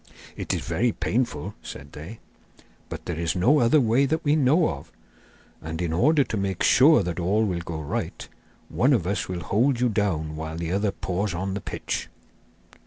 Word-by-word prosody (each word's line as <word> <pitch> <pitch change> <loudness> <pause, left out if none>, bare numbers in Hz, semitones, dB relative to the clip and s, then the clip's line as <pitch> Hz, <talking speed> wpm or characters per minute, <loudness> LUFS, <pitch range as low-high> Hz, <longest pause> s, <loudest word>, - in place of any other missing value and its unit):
'It - - -4
is - - -1
very 90 +9 0
painful,' 105 - -2
said 70 +1 -9
they, 85 +10 -9 0.7
'but - - -7
there 85 -2 -4
is 85 +1 -1
no 125 +12 +4
other 120 +5 +4
way 125 +2 +3
that 160 +3 -1
we 145 +1 +4
know 155 +3 +4
of. 70 -3 -7 0.7
And 80 +1 -5
in 85 -2 -1
order 145 - +4
to 115 - -4
make 95 -2 -2
sure 145 -3 +6
that 90 0 -3
all 100 +6 +2
will 90 -4 -1
go 85 -2 -5
right, 75 - -4 0.4
one 135 +4 +2
of 105 -10 +1
us 95 -1 -2
will 90 -1 -3
hold 120 +7 +1
you 125 0 +2
down 85 -8 -1
while 80 +1 -5
the 85 0 -3
other 100 +2 +1
pours 95 0 -3
on 95 +2 -3
the 100 - -4
pitch. - - -4
100 Hz, 190 wpm, -25 LUFS, 85-125 Hz, 0.7 s, sure